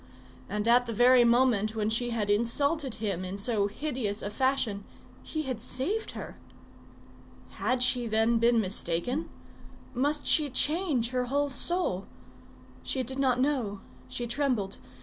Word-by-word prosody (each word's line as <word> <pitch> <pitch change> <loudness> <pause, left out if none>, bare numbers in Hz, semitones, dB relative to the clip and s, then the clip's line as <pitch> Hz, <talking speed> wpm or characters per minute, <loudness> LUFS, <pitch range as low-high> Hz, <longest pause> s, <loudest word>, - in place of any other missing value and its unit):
And 210 +2 -2
at 245 +1 +4
the 230 - -3
very 245 +2 +6
moment 235 -3 +3
when 215 0 -1
she 240 +2 0
had 225 -3 -1
insulted 260 +6 0
him 195 -4 -3
in 185 +2 -5
so 205 -1 0
hideous 225 -3 -3
a 205 - -4
fashion, 240 -4 0 0.4
he 310 -1 -4
had 255 -5 -4
saved 310 - -2
her! - - -8 1.1
Had 255 -1 0
she, 250 -1 +2
then, 225 +1 +2
been 235 0 +4
mistaken? 200 - 0 0.6
Must 290 +4 0
she 300 -3 +3
change 290 -3 +1
her 250 -1 0
whole 285 +3 0
soul? 265 - +1 0.7
She 260 - -2
did 265 +2 -6
not 255 -2 +2
know; 255 -8 -1 0.3
she 185 - -4
trembled. 240 -6 -1
245 Hz, 145 wpm, -28 LUFS, 215-270 Hz, 1.1 s, very